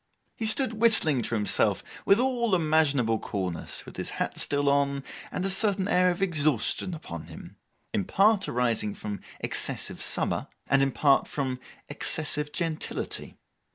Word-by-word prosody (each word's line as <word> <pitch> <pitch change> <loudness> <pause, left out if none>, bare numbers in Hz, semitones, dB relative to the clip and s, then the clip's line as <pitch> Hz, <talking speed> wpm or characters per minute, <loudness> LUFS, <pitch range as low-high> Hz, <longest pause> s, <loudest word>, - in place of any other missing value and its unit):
He 225 - -2
stood 225 -1 +1
whistling 160 - +5
to 115 +1 -2
himself 105 -2 +2 0.2
with 195 - +5
all 240 -5 +1
imaginable 145 -9 +2
coolness, 90 -4 -5
with - - -12
his - - -4
hat - - -2
still 145 0 +2
on, 140 -1 +1 0.3
and 185 - -3
a - - +1
certain 195 -1 +3
air 180 -3 +3
of 180 +2 -1
exhaustion 155 - +1
upon 85 - -8
him, 80 - -12 0.4
in 100 - 0
part 205 +1 +2
arising 115 -4 -1
from 105 -1 -6 0.2
excessive - - -1
summer, - - 0 0.2
and 135 0 +2
in 135 - +3
part 140 +1 +3
from 130 -3 -3 0.3
excessive 150 0 -1
gentility. 165 -1 -4
150 Hz, 150 wpm, -27 LUFS, 125-190 Hz, 0.4 s, whistling